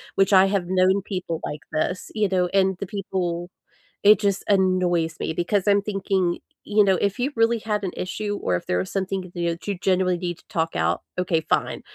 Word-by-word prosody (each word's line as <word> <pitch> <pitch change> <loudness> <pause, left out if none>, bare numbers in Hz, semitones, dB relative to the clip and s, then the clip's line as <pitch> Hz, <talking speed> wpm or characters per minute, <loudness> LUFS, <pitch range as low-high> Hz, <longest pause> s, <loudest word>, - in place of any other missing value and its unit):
which 195 +1 +3
I 190 0 +7
have 195 -2 0
known 185 +1 +3
people 180 -5 -4
like 150 - -5
this, 180 +4 -2
you 210 -3 +1
know, 180 -1 +2
and 190 -1 +2
the 200 - -3
people 180 -3 -3 0.5
it 210 0 +7
just 200 -2 0
annoys 180 -4 +2
me - - -2
because 180 +4 0
I'm 200 0 +4
thinking, 195 -3 -1 0.2
you 210 0 +3
know, 190 -2 +3
"If 200 +4 0
you 270 +4 -1
really 230 +1 +3
had 210 -2 -2
an 185 - -3
issue 205 +2 -3
or 90 - 0
if 90 - -3
there 90 - 0
was 90 - -3
something 190 -2 -3
that 175 - -5 0.3
you 200 -3 -2
genuinely 185 -1 +1
need 175 -1 -3
to - - -27
talk 165 0 -1
out, - - +1 0.2
okay, 175 -3 +1
fine. - - -1
190 Hz, 205 wpm, -23 LUFS, 175-200 Hz, 0.5 s, I